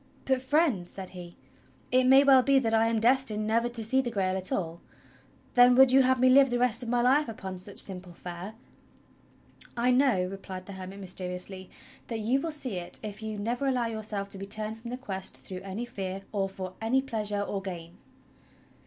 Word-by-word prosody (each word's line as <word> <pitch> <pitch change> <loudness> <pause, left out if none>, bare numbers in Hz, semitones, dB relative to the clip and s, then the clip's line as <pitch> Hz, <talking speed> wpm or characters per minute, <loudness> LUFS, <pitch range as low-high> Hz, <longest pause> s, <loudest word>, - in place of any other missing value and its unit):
' - - -30
"But, 265 -1 +1
Friend," 260 - +1
said 190 -1 -8
he, 175 -2 -10 0.5
"it 255 0 +4
may 265 +2 +7
well 270 -2 +7
be 275 +1 +3
that 230 -4 +1
I 225 0 +4
am 230 -1 +1
destined 230 -3 +2
never 230 +2 +1
to 235 -2 +2
see 260 +5 +2
the 250 - -3
Grail 190 -4 -1
at 185 -1 -3
all. 170 -2 -3 0.7
Then 245 0 +6
would 265 0 +7
you 270 +1 +6
have 260 0 +2
me 255 - +5
live 270 +1 +6
the 245 - 0
rest 245 -1 +2
of 240 - -4
my 240 0 +1
life 270 +2 +3
upon 190 -4 -7
such 195 +2 -6
simple 185 -2 -2
fare?" 180 +5 -8 1.2
"I 245 +2 +2
know," 250 -8 +3
replied 185 -1 -7
the 200 - -9
hermit 190 +1 -8
mysteriously, 185 0 -5 0.4
"that 230 - -3
you 235 +5 +1
will 330 - -3
see 260 -9 -5
it 175 -1 -4
if 210 0 -7
you 215 -1 -5
never 240 +6 -2
allow 250 -3 +1
yourself 215 -3 -4
to 195 - -8
be 195 - -5
turned 215 +2 -2
from 235 +1 -8
the 250 - -4
Quest 190 -7 -4
through 185 -1 -8
any 195 +5 -5
fear, 195 -4 -5
or 195 -2 -1
for 185 -1 -7
any 255 +4 +1
pleasure 210 -5 -1
or 200 -1 -3
gain." 175 -3 -8
220 Hz, 210 wpm, -28 LUFS, 190-250 Hz, 1.2 s, may